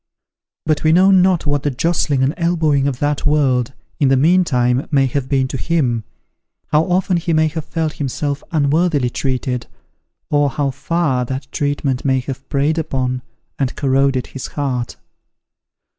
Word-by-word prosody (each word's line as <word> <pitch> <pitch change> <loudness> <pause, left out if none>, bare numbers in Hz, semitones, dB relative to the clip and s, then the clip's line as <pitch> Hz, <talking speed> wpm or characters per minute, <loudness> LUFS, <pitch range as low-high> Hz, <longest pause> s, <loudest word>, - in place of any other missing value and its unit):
But 155 -1 0
we 155 - +4
know 185 +4 +5
not 185 -3 +3
what 145 -1 0
the 145 - 0
jostling 145 -1 0
and 135 +3 +1
elbowing 160 -5 +1
of 135 -3 -2
that 145 +1 -1
world, 135 -4 +2 0.3
in 140 - +3
the 135 0 +4
meantime, 135 -6 +2
may 140 -3 +3
have 130 0 -2
been 135 -2 +1
to 135 - -3
him 125 -9 0 0.6
how 155 +2 +3
often 185 0 +1
he 170 0 -1
may 155 0 +3
have 160 -1 -5
felt 160 -2 -2
himself 145 +1 -3
unworthily 150 -3 +1
treated 130 -2 -2 0.6
or 145 -1 +3
how 140 0 -1
far 140 -2 0
that 130 +2 -4
treatment 145 -3 -1
may 130 -1 +2
have 135 +1 -7
preyed 145 +4 +1
upon 130 -5 -2 0.4
and 135 -2 -1
corroded 135 -2 +1
his 135 - -7
heart. 130 -4 -2
140 Hz, 160 wpm, -18 LUFS, 130-160 Hz, 0.6 s, know